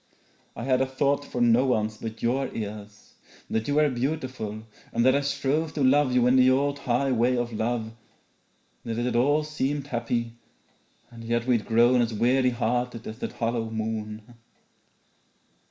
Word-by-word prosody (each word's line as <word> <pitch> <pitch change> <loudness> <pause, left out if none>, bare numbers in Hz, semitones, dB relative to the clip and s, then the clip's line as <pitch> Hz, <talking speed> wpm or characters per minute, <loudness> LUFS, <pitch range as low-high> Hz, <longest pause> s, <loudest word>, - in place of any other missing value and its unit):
I - - -6
had 130 0 +2
a 135 - +1
thought 140 +2 0
for 125 -3 -4
no 120 +1 +5
one's 110 -3 0
but 110 0 -7
your 130 +3 0
ears; 105 -1 -7 0.4
That 110 0 -1
you 145 - 0
were 150 0 +4
beautiful 125 -5 -3 0.3
and 115 +1 +1
that 130 - +6
I 140 - +2
strove 140 +3 -1
To 145 - -1
love 135 +1 +4
you 125 -1 +3
in 125 +1 +4
the 130 0 +6
old 140 +2 +1
high 135 +1 0
way 125 +1 +2
of 120 -1 -2
love; 110 0 -2 0.9
That 115 -1 -4
it 120 - -1
had 125 - -1
all 145 +5 +3
seemed 145 -2 -2
happy, 120 -3 -2 0.8
and 115 -1 -11
yet 120 +1 -1
we'd 120 -4 +1
grown 120 +2 +4
As 115 -2 -1
weary 125 +4 +3
hearted 120 -1 -2
as 110 +2 -7
that - - -4
hollow 115 -1 -2
moon. 110 0 -5
120 Hz, 170 wpm, -26 LUFS, 115-135 Hz, 0.9 s, that